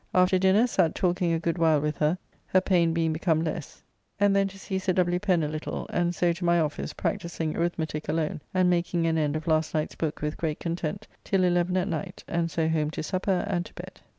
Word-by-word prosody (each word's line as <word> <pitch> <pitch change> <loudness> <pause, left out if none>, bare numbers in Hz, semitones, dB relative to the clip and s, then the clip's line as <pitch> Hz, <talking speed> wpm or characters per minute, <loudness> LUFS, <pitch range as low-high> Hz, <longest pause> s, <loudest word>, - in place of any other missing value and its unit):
After 185 0 +4
dinner 190 +5 +4
sat 170 -9 +1
talking 175 -1 +1
a 165 - +2
good 165 +1 -1
while 160 -2 +4
with 150 +1 -2
her, 155 +4 +2 0.3
her 185 - +4
[pain] 175 -3 +2
being 165 -1 +1
become 160 0 +1
less, 155 -2 -5 0.4
and 200 -1 +4
then 195 0 +3
to 195 0 -10
see 190 0 -3
Sir 185 0 0
W. 180 0 +2
Pen 180 -4 +2
a - - 0
little, 155 +1 -4
and 175 0 0
so 175 0 +2
to 175 +2 -7
my 170 0 +4
office, 150 -2 -2
practising 165 -2 -2
arithmetique 160 -3 -2
alone 155 -1 -1
and 185 -1 +3
making 175 -1 +1
an 165 -1 +2
end 150 -1 0
of 155 0 -3
last 160 -1 +1
night's 155 0 -1
book 160 -2 -3
with 150 0 -2
great 155 -2 -2
content 170 +4 -3 0.2
till 195 -2 +1
eleven 175 0 +2
at 185 +1 0
night, 160 -6 -4
and 170 0 0
so 160 0 0
home 155 -2 +1
to 155 - -5
supper 185 +2 0
and 175 0 -1
to - - -20
bed. 185 +2 -10
170 Hz, 230 wpm, -27 LUFS, 160-185 Hz, 0.4 s, After